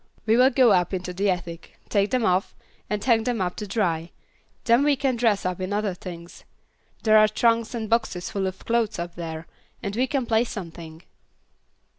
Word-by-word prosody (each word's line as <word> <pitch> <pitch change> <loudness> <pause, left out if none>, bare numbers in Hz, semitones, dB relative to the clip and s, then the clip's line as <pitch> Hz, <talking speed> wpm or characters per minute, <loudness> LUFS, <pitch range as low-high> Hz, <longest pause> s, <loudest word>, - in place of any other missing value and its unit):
We 220 0 +3
will 255 +2 +6
go 250 -3 +4
up 180 0 +2
into 180 0 -5
the 200 +3 0
attic, 175 -2 -4
take 200 -1 +1
them 250 -3 +1
off, 185 +1 +1 0.3
and 210 -1 -2
hang 230 -3 +3
them 240 -1 -1
up 180 -1 -1
to 210 - -5
dry; 175 -6 -1 0.5
then 235 +3 +4
we 290 -1 +3
can 265 -2 0
dress 225 -5 +1
up 185 0 -2
in 185 +1 -3
other 205 -1 0
things. 175 -1 -10 0.6
There 215 -1 +6
are 215 - +6
trunks 230 +1 +1
and 220 -2 -3
boxes 220 -5 -1
full 195 -2 -1
of 190 0 -7
clothes 230 -2 0
up 170 0 -5
there, 165 -1 -6 0.4
and 200 -1 -3
we 255 +3 +1
can 265 -2 -1
play 225 0 +2
something." 165 -7 -8
205 Hz, 195 wpm, -24 LUFS, 180-230 Hz, 0.6 s, will